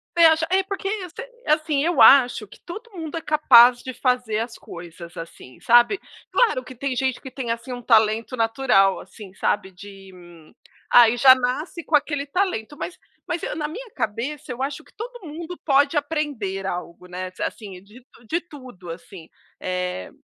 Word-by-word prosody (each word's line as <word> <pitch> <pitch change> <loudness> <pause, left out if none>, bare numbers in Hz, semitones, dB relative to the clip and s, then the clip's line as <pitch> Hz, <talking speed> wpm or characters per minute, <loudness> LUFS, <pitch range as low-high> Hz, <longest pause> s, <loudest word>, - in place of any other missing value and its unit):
Você 340 -1 +6
acha 320 0 +4
é 380 +1 +4
porque, 390 0 -5 0.6
assim 305 -2 +1
eu 345 +2 0
acho 245 -5 +6
que - - -17
todo 435 +7 -9
mundo 330 -4 -6
é - - -4
capaz 250 -6 +6
de 260 - -7
fazer 250 -4 0
as 230 +1 -4
coisas 170 0 -11
assim, 165 -6 -10
sabe. 240 - +4 0.3
Claro 435 - +2
que 255 - -11
tem 260 +1 -3
gente 260 0 -1
que 265 - -10
tem, 255 -3 -5
assim, 235 +2 -5
um 245 - -7
talento 225 +1 +2
natural 225 -4 +2
assim, 200 -4 -12
sabe 190 0 -1
de 195 +1 -13 0.8
ai 240 -1 +7
já 260 +2 +9
nasce 260 +7 -3
com 310 - +1
aquele 290 -1 0
talento 295 - -2
mas 355 - -6 0.3
mas 335 - -2 0.2
na 300 -2 -2
minha 455 +10 -8
cabeça 255 +5 -4
eu 250 +1 -6
acho 275 +1 -3
que - - -24
todo 480 -2 -9
mundo 330 +3 -7
pode 285 +1 +3
aprender 285 -11 -2
algo, 175 -1 -6
né, 185 +1 -6
assim 195 -5 -5
de 220 +6 -17 0.2
de 340 - 0
tudo, 255 - -12
assim, 170 0 -11 0.3
eh, 180 - -4
255 Hz, 170 wpm, -23 LUFS, 210-305 Hz, 0.8 s, já